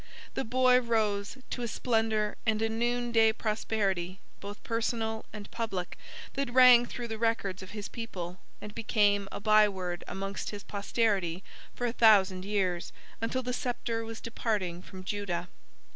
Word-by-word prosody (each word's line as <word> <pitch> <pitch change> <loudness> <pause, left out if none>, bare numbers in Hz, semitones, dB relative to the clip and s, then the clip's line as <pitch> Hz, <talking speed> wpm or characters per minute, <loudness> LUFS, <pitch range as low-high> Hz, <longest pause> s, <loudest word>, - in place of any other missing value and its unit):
The - - -1
boy 255 +1 +4
rose 215 -2 0
to 245 - -3
a 240 - -1
splendor 220 -2 0
and 220 -2 +1
a 225 - +1
noon 240 +2 0
day 225 -1 +5
prosperity, 200 -5 -1 0.2
both 205 +1 -8
personal 225 -1 -1
and 210 -1 -9
public, 200 -6 -3 0.4
that 275 -2 -2
rang 250 -1 +8
through 240 0 -5
the 220 -1 -5
records 225 -5 0
of 190 - -9
his 210 -1 -6
people, 185 -7 -6 0.2
and 210 - -8
became 205 -3 +2
a - - -5
byeword 200 -4 +3
amongst 195 0 -4
his 205 -1 -7
posterity 200 -4 0 0.3
for 245 - -2
a 235 - 0
thousand 195 -5 +5
years, 190 -4 -1 0.3
until 255 +3 -1
the 250 0 -2
sceptre 240 -3 -2
was 225 0 -7
departing 205 -7 -2
from 185 0 -10
Judah. 185 -3 -3
215 Hz, 155 wpm, -30 LUFS, 195-230 Hz, 0.4 s, rang